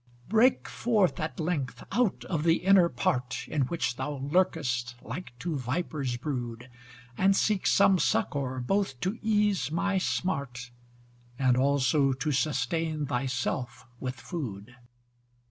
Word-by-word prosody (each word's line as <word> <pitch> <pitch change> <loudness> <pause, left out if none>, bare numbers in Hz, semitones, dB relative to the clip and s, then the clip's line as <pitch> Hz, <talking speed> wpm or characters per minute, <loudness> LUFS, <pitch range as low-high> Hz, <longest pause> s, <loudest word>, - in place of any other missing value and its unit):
Break 225 +5 +3
forth 215 -6 +1
at 155 - -4
length 155 -6 -2
out 230 -1 +1
of 165 -5 -1
the 165 0 +4
inner 190 -2 +6
part, 125 -1 -1
In 140 -5 0
which 130 -7 -2
thou 150 - -3
lurkest 135 -5 0
like 170 -9 -7
to 165 +4 -3
viper's 135 -1 -2
brood: 125 -3 -5 0.5
And 195 +1 +4
seek 205 -1 +1
some 195 -2 +5
succour 135 -3 0
both 190 -1 0
to 190 +6 -2
ease 210 - +2
my 190 +5 0
smart 140 -10 -2 0.7
And 130 -2 +3
also 135 +1 +3
to 140 +4 -2
sustain 150 +3 0
thy 135 -1 -1
self 120 0 -3
with 130 0 -4
food. 125 - -6
145 Hz, 130 wpm, -28 LUFS, 125-180 Hz, 0.7 s, inner